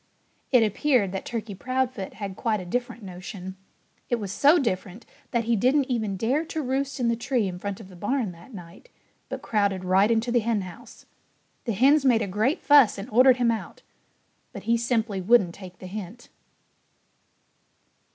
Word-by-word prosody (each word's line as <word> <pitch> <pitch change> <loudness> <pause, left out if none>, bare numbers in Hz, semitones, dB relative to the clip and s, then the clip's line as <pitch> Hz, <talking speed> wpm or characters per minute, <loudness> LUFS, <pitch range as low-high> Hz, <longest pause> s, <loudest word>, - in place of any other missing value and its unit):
It 250 -4 +6
appeared 220 -1 +1
that 190 - -5
Turkey 225 -3 -5
Proudfoot 255 -1 -3
had 200 -2 -6
quite 220 0 -1
a 185 - -7
different 240 +3 -3
notion. 185 0 -8 0.5
It 240 - +2
was 205 -5 -5
so 290 - +5
different 210 - -3 0.2
that 235 -2 0
he 230 +1 +1
didn't 260 +5 +2
even 215 -5 -1
dare 255 - 0
to 320 -1 -4
roost 270 +1 -2
in 245 - +1
the 235 - +2
tree 240 -2 -1
in 180 -1 -6
front 200 0 -5
of 215 - -11
the 185 - -14
barn 210 +3 -1
that 170 +8 -15
night, 180 - -12 0.4
but - - -6
crowded 200 -4 0
right 190 +3 +4
into 230 +1 +1
the 240 - +3
henhouse. 210 -5 -4 0.6
The 230 - -1
hens 275 +8 +4
made 240 -4 +3
a - - -3
great 220 - 0
fuss 285 -8 +6
and 200 +5 -7
ordered 255 +3 +6
him 240 -2 +2
out. 225 - -6 0.7
But - - -8
he 230 - +2
simply 225 -4 -1
wouldn't 195 -3 +4
take 185 -2 -11
the 185 - -11
hint. 210 +4 -8
225 Hz, 180 wpm, -25 LUFS, 195-250 Hz, 0.7 s, It